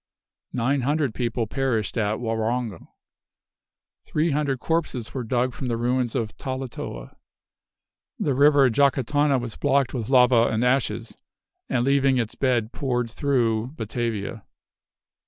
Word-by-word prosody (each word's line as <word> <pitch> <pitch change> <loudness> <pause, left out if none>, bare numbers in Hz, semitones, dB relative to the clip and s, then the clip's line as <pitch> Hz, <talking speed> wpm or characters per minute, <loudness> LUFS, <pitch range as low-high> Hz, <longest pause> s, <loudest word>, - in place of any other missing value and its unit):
Nine 130 +3 +1
hundred 140 -1 0
people 120 -1 -1
perished 120 -3 -1
at 110 -2 0
Waronge. 115 -1 -2 1.2
Three 155 +2 0
hundred 140 -2 0
corpses 145 -7 -2
were 130 - -3
dug 125 +2 0
from 130 - -5
the 115 -1 -1
ruins 125 0 0
of 110 -2 -2
Talatoa. 130 - -6 1.0
The 140 - 0
river 140 0 +5
Jacatana 140 +2 +2
was 120 -2 -6
blocked 140 -2 +1
with 120 -4 -3
lava 125 -3 +5
and 115 +2 0
ashes, 120 -3 0 0.5
and 120 -1 +1
leaving 135 -1 +3
its 115 -3 -1
bed 120 -4 0
poured 125 -4 -2
through 120 -2 0
Batavia. 110 -2 -3
125 Hz, 125 wpm, -24 LUFS, 115-135 Hz, 1.2 s, river